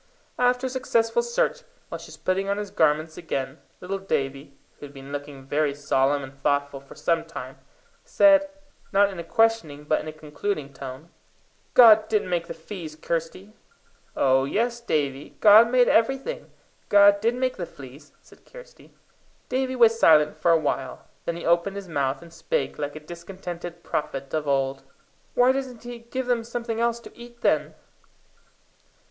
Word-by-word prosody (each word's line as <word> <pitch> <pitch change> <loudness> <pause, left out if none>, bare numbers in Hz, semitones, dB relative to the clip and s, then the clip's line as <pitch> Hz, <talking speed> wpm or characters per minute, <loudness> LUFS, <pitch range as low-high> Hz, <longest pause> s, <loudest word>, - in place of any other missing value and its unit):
After 250 +1 +2
a - - -1
successful 250 - +1
search, - - -1 0.3
while - - -6
she - - -11
was - - -12
putting 190 +1 -1
on 200 - 0
his 205 -1 -5
garments 155 0 +1
again, 135 -3 -4 0.2
little 195 +2 -4
Davie, 140 -6 -3 0.2
who 145 - -8
had 140 - -18
been 135 +1 -10
looking 145 -1 -7
very 145 +1 0
solemn 140 0 +1
and 135 0 -9
thoughtful 145 -1 0
for 140 - -15
some 165 -1 0
time, 165 0 -9 0.4
said, 295 -1 +4 0.4
not 200 0 +4
in 190 - -8
a - - -4
questioning, 170 -7 +1
but 155 +1 +1
in - - -9
a - - -4
concluding 155 0 -5
tone 135 +4 -9 0.7
"God 220 -3 +8
didn't 210 -4 0
make 170 -1 -1
the - - -7
fees, 165 -2 -8
Kirsty!" 165 +6 -4 0.6
"Oh 135 0 +3
yes, 235 - -1
Davie! 145 - -2
God 220 +2 +8
made 250 0 +4
everything. 270 - +1 0.4
God 200 0 +6
did 230 +2 +1
make 255 0 -1
the 175 -3 -4
fleas," 135 +1 -13
said - - -20
Kirsty. - - -15 0.5
Davie 260 0 -1
was 230 -2 +4
silent 155 -4 +5
for 155 +2 0
a 165 - +6
while. 135 -4 -3 0.2
Then 170 - -2
he 170 - -7
opened 170 +4 +2
his 200 -2 -7
mouth 140 -2 -2
and 170 -1 -15
spake - - -2
like 145 0 -4
a - - -6
discontented 175 +1 -8
prophet 135 -2 -4
of 155 -2 -1
old: 135 -1 0 0.5
"Why 245 +1 +5
doesn't 260 -3 -4
he 240 0 -8
give 250 +3 -5
them 245 -2 0
something 230 -1 -4
else 235 0 +1
to - - -14
eat, 240 0 -13
then?" - - +1
175 Hz, 170 wpm, -25 LUFS, 145-230 Hz, 0.7 s, God